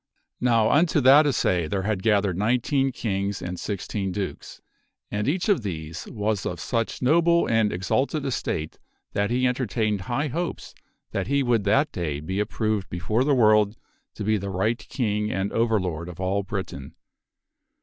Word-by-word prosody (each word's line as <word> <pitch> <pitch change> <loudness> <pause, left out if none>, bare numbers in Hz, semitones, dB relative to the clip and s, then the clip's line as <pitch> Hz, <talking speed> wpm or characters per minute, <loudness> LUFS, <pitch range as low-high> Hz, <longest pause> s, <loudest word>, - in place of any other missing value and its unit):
Now 115 -3 +3
unto 155 +1 +3
that 140 +4 +7
assay 90 - +1
there 95 +3 -2
had 100 -2 -1
gathered 100 -4 +2
nineteen 125 - +1
kings 100 -5 -2
and 90 0 -5
sixteen 100 -1 -3
dukes, 95 0 -5 0.5
and 105 +2 -1
each 175 +5 0
of 200 - +3
these 80 -5 -6
was 105 -3 -1
of 90 - -4
such 115 +5 -2
noble 170 +5 +4
and 110 -2 +2
exalted 130 - -1
estate 80 - -3 0.3
that 100 0 0
he 125 +2 +1
en 125 - +3
tertained 110 -4 -1
high 130 +10 -2
hopes 170 +6 -4 0.4
that - - -2
he 140 0 +2
would 120 -5 +1
that 110 +10 +3
day 75 -5 -3
be 95 +6 -3
approved 105 -2 -1
before 105 +8 0
the 140 0 +3
world 105 -2 +4 0.4
to 105 - -5
be 110 +1 +2
the 100 0 -4
right 110 +5 0
king 105 -4 -1
and 95 +1 -1
overlord 95 -8 0
of 90 - -10
all 95 +2 0
Britain. 95 -9 -6
105 Hz, 165 wpm, -25 LUFS, 95-125 Hz, 0.5 s, that